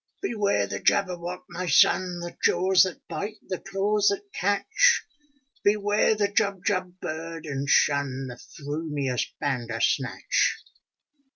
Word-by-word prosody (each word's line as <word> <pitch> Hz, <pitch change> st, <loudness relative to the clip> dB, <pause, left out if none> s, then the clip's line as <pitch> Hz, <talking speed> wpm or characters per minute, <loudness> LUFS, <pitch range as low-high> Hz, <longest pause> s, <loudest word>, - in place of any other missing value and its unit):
''Beware 210 Hz, -, +1 dB
the -, -, -4 dB
Jabberwock, 180 Hz, -1 st, 0 dB
my 175 Hz, +1 st, -5 dB
son! 175 Hz, +4 st, +3 dB
The 175 Hz, 0 st, -7 dB
jaws 185 Hz, +1 st, +4 dB
that 185 Hz, -, -8 dB
bite, 215 Hz, +2 st, -5 dB
the 185 Hz, -, -3 dB
claws 200 Hz, +2 st, 0 dB
that 200 Hz, 0 st, -1 dB
catch! 415 Hz, -, +2 dB, 0.6 s
Beware 205 Hz, +1 st, +3 dB
the 205 Hz, -1 st, +1 dB
Jubjub 195 Hz, -3 st, -1 dB
bird, 165 Hz, 0 st, -6 dB
and 140 Hz, -2 st, -3 dB
shun 140 Hz, -2 st, +2 dB
The 125 Hz, -, -6 dB
f 120 Hz, -, -16 dB
rumious 145 Hz, -3 st, -2 dB
Bandersnatch 125 Hz, -1 st, 0 dB
180 Hz, 120 wpm, -26 LUFS, 145-200 Hz, 0.6 s, jaws